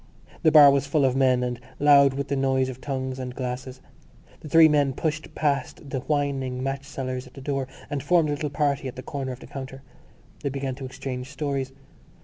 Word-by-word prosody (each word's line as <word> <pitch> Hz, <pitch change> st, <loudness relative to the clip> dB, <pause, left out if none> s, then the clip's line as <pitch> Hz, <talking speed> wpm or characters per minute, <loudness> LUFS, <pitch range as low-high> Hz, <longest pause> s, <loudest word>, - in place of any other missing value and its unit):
The 160 Hz, -, +4 dB
bar 150 Hz, -2 st, +9 dB
was 140 Hz, 0 st, +1 dB
full 145 Hz, -1 st, +2 dB
of 130 Hz, -1 st, +2 dB
men 130 Hz, -2 st, +3 dB
and 125 Hz, -1 st, -3 dB, 0.2 s
loud 140 Hz, -2 st, +6 dB
with 140 Hz, 0 st, -3 dB
the 140 Hz, -, 0 dB
noise 135 Hz, -1 st, +1 dB
of 130 Hz, 0 st, -8 dB
tongues 130 Hz, -2 st, -3 dB
and 125 Hz, -1 st, -5 dB
glasses. 130 Hz, 0 st, -5 dB, 0.6 s
The 155 Hz, -, -10 dB
three 165 Hz, +1 st, +8 dB
men 145 Hz, -3 st, +2 dB
pushed 155 Hz, +3 st, -3 dB
past 140 Hz, -1 st, -2 dB
the 130 Hz, -, -1 dB
whining 135 Hz, -3 st, -1 dB
match 135 Hz, 0 st, -3 dB
sellers 130 Hz, -2 st, -5 dB
at 125 Hz, -, -18 dB
the -, -, -9 dB
door 135 Hz, -1 st, -2 dB, 0.2 s
and 145 Hz, -1 st, -3 dB
formed 165 Hz, +1 st, +3 dB
a -, -, +1 dB
little 145 Hz, +1 st, -3 dB
party 140 Hz, -1 st, 0 dB
at 125 Hz, -, -7 dB
the 130 Hz, -, -8 dB
corner 135 Hz, -2 st, -4 dB
of 125 Hz, -, -9 dB
the -, -, -10 dB
counter. 135 Hz, 0 st, -8 dB, 0.6 s
They 140 Hz, -, -1 dB
began 135 Hz, -1 st, -3 dB
to 135 Hz, +1 st, -7 dB
exchange 130 Hz, -1 st, -6 dB
stories. 140 Hz, -2 st, -3 dB
135 Hz, 210 wpm, -25 LUFS, 130-145 Hz, 0.6 s, bar